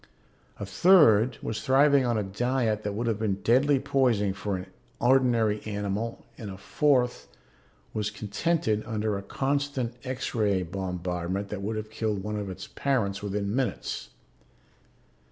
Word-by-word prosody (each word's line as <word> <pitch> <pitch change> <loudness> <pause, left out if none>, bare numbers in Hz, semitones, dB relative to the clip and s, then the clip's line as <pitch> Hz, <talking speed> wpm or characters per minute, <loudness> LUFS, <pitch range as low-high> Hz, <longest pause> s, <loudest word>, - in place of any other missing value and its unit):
A 100 - -3
third 115 - +5
was 110 - -3
thriving 135 0 +4
on 120 -2 +1
a 105 - 0
diet 110 +2 0
that 105 -1 -3
would 115 +4 -2
have 110 -2 0
been 105 -3 0
deadly 135 +4 +4
poison 115 -8 +1
for 100 -1 -3
an 90 - -7 0.3
ordinary 120 -4 +3
animal 105 +2 -3
and 110 -4 -6
a 95 - -7
fourth 125 - +1 0.7
was 105 -1 -1
contented 110 +3 -1
under 110 -2 -1
a 100 - -3
constant 135 +2 -1
X 130 -1 -4
ray 100 -5 +1
bombardment 90 +1 -3
that 105 -2 -5
would 110 +3 -2
have 110 0 -5
killed 110 -3 -2
one 105 +1 -3
of 100 -1 -4
its 95 0 -7
parents 105 -8 -1
within 100 +1 -2
minutes. 130 -2 -2
110 Hz, 150 wpm, -27 LUFS, 100-125 Hz, 0.7 s, third